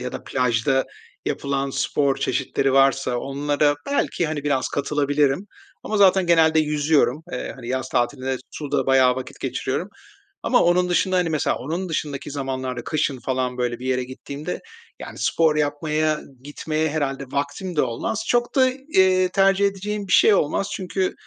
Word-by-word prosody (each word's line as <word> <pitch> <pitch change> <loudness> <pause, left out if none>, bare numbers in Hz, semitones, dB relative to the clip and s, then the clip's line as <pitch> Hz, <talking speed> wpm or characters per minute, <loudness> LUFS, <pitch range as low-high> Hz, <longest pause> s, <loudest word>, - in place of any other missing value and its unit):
ya 125 0 -5
da - - -7
plajda 125 +1 +1 0.4
yapılan 140 0 -1
spor 135 +1 0
çeşitleri 135 0 0
varsa 135 -2 +3
onlara 145 +2 +1
belki, 280 -11 0
hani, 150 -2 -4
biraz 140 -3 0
katılabilirim 145 +3 0 0.4
ama 215 - -2
zaten 190 -2 +5
genelde 160 -2 +4
yüzüyorum. 150 -2 +1
Eee, 125 - -4
hani, 120 -1 -9
yaz 130 0 -2
tatilinde 130 +2 -1
suda 145 -2 -2
bayağı 130 -1 +4
vakit 130 -1 -7
geçiriyorum 130 +6 -2 0.6
ama 245 - +3
onun 180 +1 +3
dışında, 185 +1 +1
hani, 175 -2 +1
mesela 155 -3 0
onun 165 +9 -4
dışındaki 145 -3 -3
zamanlarda, 130 -3 -4
kışın 145 -3 -1
falan 125 0 -2
böyle 120 -1 -2
bir 125 - -8
yere 130 -1 0
gittiğimde, 140 +5 -6 0.4
yani, - - -9
spor 160 -2 +2
yapmaya 150 +1 0 0.2
gitmeye 155 +2 -2
herhâlde 140 -3 -2
vaktim 145 +7 -4
de 150 - +3
olmaz. 200 - -2
Çok 240 +2 +1
da, 260 -1 +5
eee, 190 -9 +2
tercih 195 +1 +3
edeceğim 200 +1 -4
bir - - -6
şey 215 - +6
olmaz. 190 +2 +1
Çünkü, 185 0 -2
145 Hz, 155 wpm, -22 LUFS, 135-175 Hz, 0.6 s, şey